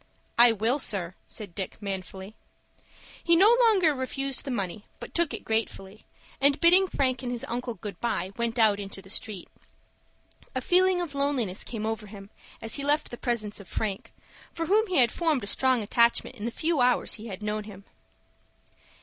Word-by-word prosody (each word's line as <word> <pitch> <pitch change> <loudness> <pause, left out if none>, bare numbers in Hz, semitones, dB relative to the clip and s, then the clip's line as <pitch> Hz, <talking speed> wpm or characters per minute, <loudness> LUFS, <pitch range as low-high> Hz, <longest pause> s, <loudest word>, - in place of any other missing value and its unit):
"I 240 0 +9
will, 225 +6 +1
sir," 185 -9 -1
said 205 -6 -6
Dick, 190 +1 -6
manfully. 195 0 -6 0.9
He 340 - +4
no 410 +7 +6
longer 400 -10 +4
refused 270 0 -1
the - - -5
money, 205 -3 -4
but - - -9
took 340 -3 +1
it - - -6
gratefully, 220 -2 -3 0.4
and, 280 +1 +4
bidding 365 +3 +6
Frank 260 -7 0
and 245 -2 -4
his 240 -1 -2
uncle 240 0 -4
good 205 +1 -8
by, 195 -5 -2
went 235 0 -2
out 215 -3 +4
into 195 -1 -7
the 190 - -11
street. 205 -4 -4 1.1
A - - +1
feeling 365 +4 +3
of 335 -5 -5
loneliness 275 -9 -1
came 220 -3 -5
over 220 -1 -3
him 200 0 -12 0.3
as 225 +3 +1
he 280 - -4
left 295 +2 +1
the - - -5
presence 230 -4 -2
of 200 - -12
Frank, 200 -3 -4 0.4
for 330 - -4
whom 430 +5 +3
he 370 -3 0
had 240 -4 +5
formed 315 -8 0
a - - -3
strong 255 +3 +1
attachment 235 +4 +2
in 215 -3 -7
the - - 0
few 315 +1 0
hours 245 0 +2
he 225 +1 -7
had 200 -1 -7
known 210 0 -3
him. 200 -2 -12
235 Hz, 185 wpm, -27 LUFS, 205-280 Hz, 1.1 s, I